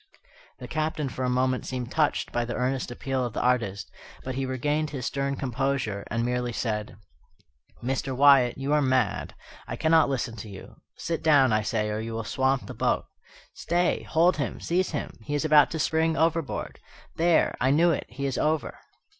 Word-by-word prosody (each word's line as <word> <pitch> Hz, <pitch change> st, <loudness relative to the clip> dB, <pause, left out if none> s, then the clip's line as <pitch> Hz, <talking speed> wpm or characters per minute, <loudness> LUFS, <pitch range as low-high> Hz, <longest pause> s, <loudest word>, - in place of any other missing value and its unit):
The 125 Hz, -, -9 dB
Captain 155 Hz, -1 st, -2 dB
for 130 Hz, -, -5 dB
a 125 Hz, -, +1 dB
moment 130 Hz, 0 st, +1 dB
seemed 125 Hz, -1 st, -4 dB
touched 155 Hz, -2 st, 0 dB
by 120 Hz, -, 0 dB
the 120 Hz, 0 st, -4 dB
earnest 125 Hz, +1 st, -1 dB
appeal 130 Hz, +1 st, -2 dB
of 120 Hz, -3 st, -3 dB
the -, -, -2 dB
artist, 115 Hz, -6 st, 0 dB, 0.3 s
but 130 Hz, -, -4 dB
he 135 Hz, +1 st, -2 dB
regained 145 Hz, +4 st, -1 dB
his 135 Hz, -3 st, -5 dB
stern 140 Hz, 0 st, -1 dB
composure, 130 Hz, -5 st, -2 dB
and 115 Hz, +1 st, -1 dB
merely 125 Hz, 0 st, -1 dB
said: 105 Hz, -3 st, -3 dB, 0.9 s
"Mr. 130 Hz, +1 st, -2 dB
Wyatt, 135 Hz, -3 st, +6 dB
you 135 Hz, +2 st, -1 dB
are 150 Hz, -, +4 dB
mad. 130 Hz, -5 st, 0 dB, 0.3 s
I -, -, -4 dB
cannot 160 Hz, -2 st, +3 dB
listen 125 Hz, -4 st, -2 dB
to 105 Hz, +1 st, -8 dB
you. 95 Hz, -1 st, -11 dB, 0.2 s
Sit 165 Hz, -1 st, -3 dB
down, 140 Hz, -7 st, +5 dB
I 110 Hz, -, +3 dB
say, 105 Hz, 0 st, -1 dB
or 105 Hz, -, -2 dB
you 115 Hz, +1 st, -5 dB
will 115 Hz, 0 st, -3 dB
swamp 130 Hz, +4 st, 0 dB
the -, -, -7 dB
boat. -, -, 0 dB, 0.5 s
Stay! 175 Hz, +1 st, 0 dB
hold 170 Hz, +3 st, +2 dB
him, 140 Hz, -4 st, -3 dB
seize 185 Hz, +2 st, 0 dB
him! 145 Hz, -, -5 dB
he 145 Hz, +7 st, -4 dB
is 145 Hz, -, -1 dB
about 150 Hz, -1 st, +6 dB
to 160 Hz, -, -4 dB
spring 160 Hz, +1 st, +1 dB
overboard! 165 Hz, -3 st, -1 dB, 0.4 s
There 170 Hz, 0 st, +3 dB
I 130 Hz, -, +3 dB
knew 165 Hz, +5 st, +4 dB
it 150 Hz, -, -2 dB
he 140 Hz, +3 st, -5 dB
is 135 Hz, -2 st, -1 dB
over!" 155 Hz, 0 st, -1 dB
135 Hz, 190 wpm, -26 LUFS, 120-150 Hz, 0.9 s, Wyatt